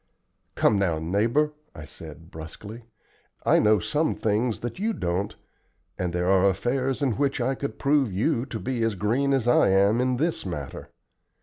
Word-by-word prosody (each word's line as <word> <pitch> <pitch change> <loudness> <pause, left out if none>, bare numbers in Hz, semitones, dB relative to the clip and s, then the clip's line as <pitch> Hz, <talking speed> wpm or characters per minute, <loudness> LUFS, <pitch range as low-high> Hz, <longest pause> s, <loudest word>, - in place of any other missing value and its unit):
"Come 105 - +3
now, 85 -5 +1
neighbor," 115 - +1 0.2
I 75 - -8
said, 80 +1 -11
brusquely, 100 +9 -9 0.6
"I - - +5
know 105 0 +4
some 150 - 0
things 110 +2 0
that 120 +7 -5
you 220 +3 0
don't, 90 - -2 0.6
and 90 -1 -2
there 90 +1 -1
are 95 +1 +4
affairs 130 +8 -1
in 130 -6 0
which 140 -1 0
I 125 +2 +1
could 140 +1 -5
prove 140 -5 +2
you 120 - 0
to 115 - -5
be 125 -1 -3
as 115 -2 +1
green 120 +8 0
as 130 -4 +1
I 120 - +5
am 100 +5 +3
in 125 0 +1
this 165 +5 -1
matter. 75 -8 -6
115 Hz, 175 wpm, -25 LUFS, 95-135 Hz, 0.6 s, I